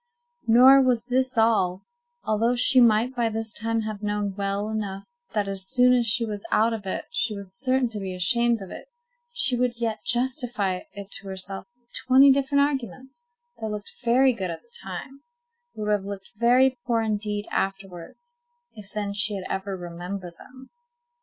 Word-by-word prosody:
Nor 255 +4 +7
was 250 -3 +2
this 255 0 0
all: 200 -5 +2 0.4
although 225 +3 +1
she 250 +1 +4
might 235 +2 +3
by 235 -2 +1
this 225 0 -2
time 225 +1 -1
have 215 -2 -5
known 205 -1 -2
well 200 +1 -2
enough 205 -3 -4 0.3
that 205 -2 0
as 195 -1 -1
soon 250 -1 +5
as 240 -2 +2
she 230 +2 +2
was 210 -2 -5
out 225 +2 +2
of 205 -3 -6
it - - -3
she 235 -9 -1
was 200 -2 -8
certain 255 +2 +1
to 215 -2 -5
be 190 -2 -5
ashamed 235 +3 +2
of 190 - -11
it, - - -9 0.4
she 270 - +2
would 245 -1 -1
yet 225 -2 -2
justify 240 -7 0
it 200 -1 -9
to 200 - -1
herself 190 0 -7
with 240 0 -37
twenty 265 +2 +5
different 280 +1 +2
arguments 265 - -4 0.4
that 220 - -4
looked 210 -1 -7
very 255 +2 +4
good 190 -5 -4
at 165 -1 -7
the 235 - -12
time, 195 +10 -8 0.5
but 215 - -5
would 210 - 0
have 205 -2 +1
looked 195 -1 -8
very 250 +4 +4
poor 230 -2 +2
indeed 210 -1 -2
afterwards, 195 - -4 0.4
if 205 -2 -12
then 205 -1 -3
she 205 +1 +3
had 190 -1 -6
ever 190 0 -3
remembered 175 +1 -7
them. 260 +1 -15
220 Hz, 180 wpm, -25 LUFS, 200-250 Hz, 0.5 s, Nor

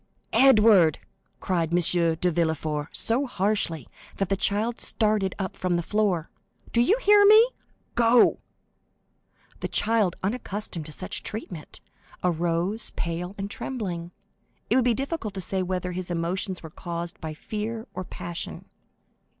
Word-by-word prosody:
"Edward," 215 - +6 0.4
cried 170 -3 -1
M. 175 - +3 0.4
de 180 +2 +1
Villefort, 155 -2 -1
so 255 +5 0
harshly 195 - -1 0.3
that 195 - -1
the 195 - +2
child 210 +4 0
started 210 -4 0
up 190 -2 -4
from 180 -1 -1
the 170 - 0
floor, 195 -5 0 0.4
"do 235 - +4
you 380 - +4
hear 415 -4 +6
me?—Go!" 400 - +4 1.2
The - - -2
child, 215 -4 +2
unaccustomed 200 -6 -3
to - - -9
such 185 +4 -3
treatment, 180 -7 -7 0.4
arose, 175 +4 0
pale 170 +3 -3
and 200 0 -3
trembling; 190 -8 -4 0.6
it - - +5
would 255 -2 +3
be 240 -2 +3
difficult 270 - -3
to - - -3
say 190 +2 -2
whether 180 0 -2
his 180 0 -5
emotion 175 +3 -1
were 160 - -9
caused 170 0 -6
by 155 -1 -5
fear 220 +6 -4
or 185 - -4
passion. 175 -1 -6
190 Hz, 135 wpm, -26 LUFS, 170-225 Hz, 1.2 s, Edward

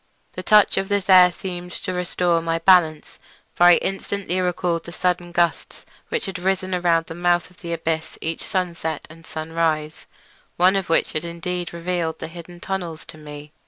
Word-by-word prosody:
The - - -5
touch 210 -1 +5
of 195 0 -1
this 200 -1 +1
air 180 -1 +8
seemed 180 0 -7
to 185 - -4
restore 180 -1 0
my 165 0 -1
balance, 165 -3 +3 0.3
for 175 - +4
I 175 0 +9
instantly 195 -1 -2
recalled 175 -2 -1
the 170 - -8
sudden 175 0 -1
gusts 170 -3 -1 0.2
which - - -1
had 190 -1 -5
risen 190 0 -1
around 170 -2 +2
the - - -8
mouth 175 +1 +1
of 180 - -23
the 170 - -6
abyss 160 -1 -3
each 165 0 -4
sunset 170 -5 -3
and 165 +1 -15
sunrise, 155 -1 -2 0.5
one 185 +2 +4
of 195 -3 -1
which 165 - +2
had 155 - -2
indeed 170 +1 -4
served - - -4
to 170 - -9
reveal 170 -1 -1
the 160 - -8
hidden 175 +1 -11
tunnels 175 -4 -5
to 155 - -12
me. 150 0 -10
175 Hz, 190 wpm, -22 LUFS, 165-180 Hz, 0.5 s, I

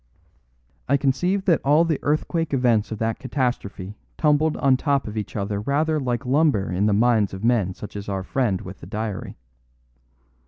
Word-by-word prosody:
"I 140 - +4
conceive 180 +9 0
that 170 -5 +3
all 150 +4 +4
the 160 -3 0
earthquake 155 +1 0
events 120 -5 +2
of 110 - -3
that 115 +1 -2
catastrophe 105 -7 -3 0.2
tumbled 150 0 +2
on 135 -2 +3
top 140 -1 0
of 105 - -6
each 105 -2 -5
other 100 -1 -2
rather 155 +6 +1
like 125 -1 -2
lumber 130 - +2
in 95 +4 +1
the - - +2
minds 110 -2 +2
of 95 - -9
men 110 -6 +1
such 105 - -9
as 100 0 -6
our 95 -1 -2
friend 110 -3 0
with 95 -1 -9
the - - -11
diary. 105 -1 -5
120 Hz, 180 wpm, -23 LUFS, 105-145 Hz, 0.2 s, I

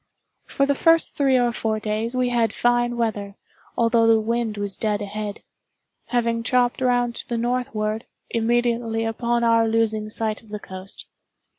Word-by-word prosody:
For 275 - +1
the 280 - +2
first 330 +3 +3
three 270 -2 +3
or 245 -1 +2
four 220 -2 -2
days 215 +3 -2
we 250 -1 +1
had 235 -3 +1
fine 240 0 +1
weather, 205 -4 -2 0.4
although 230 0 +3
the 225 -1 +5
wind 225 -1 -1
was 205 -1 -3
dead 210 -1 -1
ahead; 205 0 -5 0.6
having 235 -1 0
chopped 245 +1 +1
round 245 -1 +2
to - - -8
the 235 - -1
northward, 230 -2 -1 0.2
immediately 230 -1 0
upon 235 +1 0
our 230 -1 +4
losing 220 -1 0
sight 215 -1 -2
of 225 - -20
the 210 - -4
coast. 190 -1 -8
230 Hz, 160 wpm, -23 LUFS, 215-240 Hz, 0.6 s, the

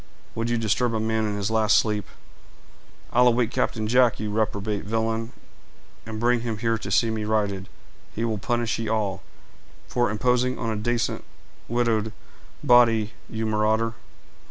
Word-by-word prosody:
Would 115 +1 -2
you 120 - +1
disturb 115 +1 +1
a - - 0
man 110 0 0
in 105 - -2
his 100 +1 -2
last 110 -1 +4
sleep?" 105 -2 0 1.1
"I'll 125 +1 +5
awake 120 -1 +2
Captain 110 -2 -1
Jack, 125 +1 +3
you 105 -1 -3
reprobate 105 -1 -1
villain, 115 +2 -1 0.8
and 110 -1 -5
bring 120 +1 +2
him 115 -2 -3
here 115 0 0
to 100 - -6
see 115 +4 +2
me 110 -1 -2
righted; 100 -3 -1 0.4
he 115 - -2
will 110 -3 -1
punish 120 0 -1
ye 115 - -3
all, 105 -3 -1 0.7
for 120 -2 +1
imposing 125 +4 +1
on 115 -2 -2
a - - -2
dacent 115 +2 -1 0.5
widowed 115 -2 0 0.5
body, 115 -3 +4 0.2
you 110 0 -3
marauder!" 110 +1 +1
110 Hz, 155 wpm, -25 LUFS, 105-120 Hz, 1.1 s, I'll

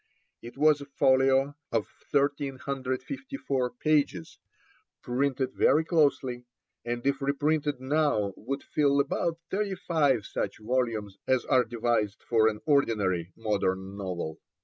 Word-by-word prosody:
It 120 +3 -10
was 150 0 +4
a 140 - -8
folio 135 0 +3 0.2
of 115 -3 +1 0.2
1,354 140 - -2
pages, 140 - 0 0.6
printed 130 +1 0
very 155 +4 +3
closely, 140 -7 +1 0.4
and 120 +1 -4
if 140 0 +1
reprinted 145 0 0
now 130 -7 +1
would 135 +5 -5
fill 140 -2 +2
about 165 +4 0
thirty 200 0 -1
five 145 - +1
such - - -3
volumes 110 -3 -2
as 130 -1 +2
are 130 -1 +4
devised 115 -3 -1
for 110 -2 +3
an 105 -1 -1
ordinary 100 - +1
modern 95 -3 -1
novel. 90 -5 -4
130 Hz, 120 wpm, -28 LUFS, 110-145 Hz, 0.6 s, was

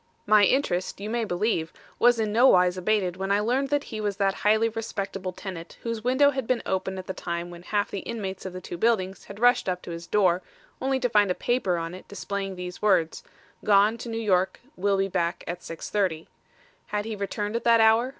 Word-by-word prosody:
"My 210 -1 +6
interest, 190 -9 0
you 210 +2 -5
may 235 -1 0
believe, 175 -4 -1 0.3
was 240 0 +5
in 215 -1 0
no 240 +4 +6
wise 180 -4 +5
abated 185 -1 0
when 195 +1 -2
I 200 - +4
learned 255 +6 0
that 290 0 +1
he 215 -1 -6
was 205 -2 -2
that 195 -1 +2
highly 220 +2 +4
respectable 195 -4 -4
tenant 180 -2 -8
whose 230 -2 -3
window 260 +4 +4
had 265 -4 -4
been 255 -2 0
open 190 0 -2
at 185 - -6
the 190 - -4
time 170 -1 -4
when 175 0 -10
half 205 +3 -1
the 200 - -3
inmates 195 -3 -5
of 190 - -5
the 185 0 -7
two 175 - -7
buildings 195 -4 0
had 200 +1 -10
rushed 245 -4 +4
up 180 0 -3
to - - -7
his 170 0 -7
door, 185 -4 +3 0.4
only 265 0 +1
to 250 - +1
find 205 -3 +4
a 180 - +1
paper 240 -8 0
on 165 +1 -4
it 185 - -11
displaying 200 -1 -4
these 180 0 -7
words: 190 -6 +2 0.4
Gone 205 +2 +5
to 235 - -6
New 225 - -3
York; 190 -4 +1 0.2
will 200 +1 +1
be 195 0 +1
back 170 -1 -1
at 175 +1 -4
6:30. 165 -1 -2 0.6
Had 205 0 -2
he 220 -1 -4
returned 205 +1 -3
at 235 - -1
that 230 -1 +6
hour? 225 +3 +5
200 Hz, 220 wpm, -26 LUFS, 185-225 Hz, 0.6 s, My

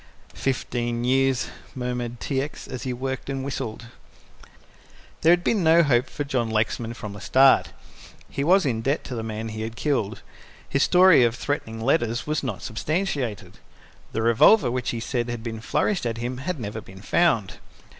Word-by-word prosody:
"Fifteen 120 -2 -2
years," 135 0 +2 0.3
murmured 125 -2 -4
T. 135 -2 -1
X., 145 +2 -7
as 130 - -6
he 130 - -3
worked 130 +2 -4
and 135 -1 -3
whistled. 120 -4 -5 1.4
There 165 - +5
had 175 0 +3
been 205 -1 +1
no 165 +1 +6
hope 125 -3 +2
for 145 - -4
John 125 -5 -1
Lexman 110 +1 -1
from 105 -3 -7
the 100 - -10
start. 135 0 +4 0.6
He 140 - -3
was 185 +3 +4
in 115 -5 0
debt 135 +6 0
to 130 - -7
the 115 - -3
man 110 0 -4
he 110 +1 -4
killed. 115 -3 -2 0.4
His 140 - 0
story 180 -6 +6
of 120 -1 +2
threatening 120 -4 -3
letters 120 -2 +1
was 150 +1 -1
not 120 -8 -4
substantiated. 140 - -3 0.5
The 110 - -2
revolver 120 - +5
which 125 -1 -2
he 120 - -2
said 120 0 -2
had 120 -2 -5
been 110 -2 -5
flourished 180 - 0
at 115 -1 -3
him 120 +2 -4
had 150 +4 -4
never 110 -1 -5
been 95 0 -14
found. 130 - +1
125 Hz, 175 wpm, -24 LUFS, 115-140 Hz, 1.4 s, no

